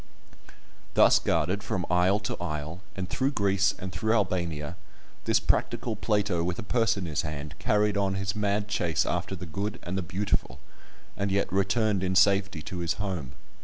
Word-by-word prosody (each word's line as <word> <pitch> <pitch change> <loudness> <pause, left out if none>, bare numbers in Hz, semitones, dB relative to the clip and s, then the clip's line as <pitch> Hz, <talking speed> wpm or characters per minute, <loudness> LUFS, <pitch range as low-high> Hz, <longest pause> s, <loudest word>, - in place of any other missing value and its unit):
Thus - - +7
guarded 100 +3 0
from 100 -3 -2
isle 90 +3 +3
to 105 - -3
isle, 80 +1 -4
and 95 -1 -3
through 135 +7 0
Greece, 100 -3 +2
and 95 0 -6
through 110 +5 0
Albania, 85 -6 -1 0.5
this - - +3
practical 115 -3 0
Plato 105 -5 +1
with 90 +1 -2
a - - -5
purse 115 +2 +2
in 95 - -3
his 80 -3 -1
hand, 75 -1 -5
carried 105 0 +2
on 100 -1 +1
his 95 +1 -2
mad 105 0 0
chase 85 -6 +1
after - - -2
the - - -7
good 100 +6 -3
and 90 - -4
the 95 - 0
beautiful, 90 -8 -2 0.6
and 100 0 -1
yet 100 -1 0
returned 100 +1 +2
in 95 0 0
safety 100 -4 +3
to 90 - -5
his 85 -1 0
home. 90 -11 -4
95 Hz, 175 wpm, -28 LUFS, 85-105 Hz, 0.6 s, Thus